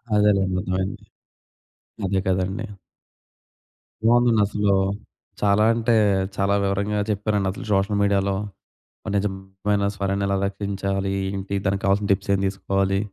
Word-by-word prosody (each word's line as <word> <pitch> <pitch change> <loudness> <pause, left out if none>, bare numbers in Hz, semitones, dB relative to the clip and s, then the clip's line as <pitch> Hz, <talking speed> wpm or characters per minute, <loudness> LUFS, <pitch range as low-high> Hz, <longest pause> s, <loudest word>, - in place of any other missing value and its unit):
అదేలేండి, 100 -3 +3
అర్ధమైంది. 95 0 -3 1.0
అదే 95 0 +1
గదండీ! 95 +4 -1 1.4
బావుందండసలు. 105 -4 +3 0.7
చాలా 105 +1 +3
అంటే 115 0 +1 0.4
చాలా 100 0 +1
వివరంగా 100 +2 0
చెప్పారండి. 105 -1 0
అసలు 110 +6 -8
సోషల్ 100 +1 +2
మీడియాలో 100 -1 +2 0.7
ఒక - - -3
నిజమైన 100 0 -1
స్వరాన్ని 100 0 -1
ఎలా 100 - +1
రక్షించాలి? 100 -1 -2 0.2
ఏంటి? 100 0 -4
దానికి 95 0 0
కావాల్సిన 100 +1 +1
టిప్స్ 100 0 0
ఏం 95 - +1
తీసుకోవాలి. 95 0 0
100 Hz, 110 wpm, -23 LUFS, 95-105 Hz, 1.4 s, అదేలేండి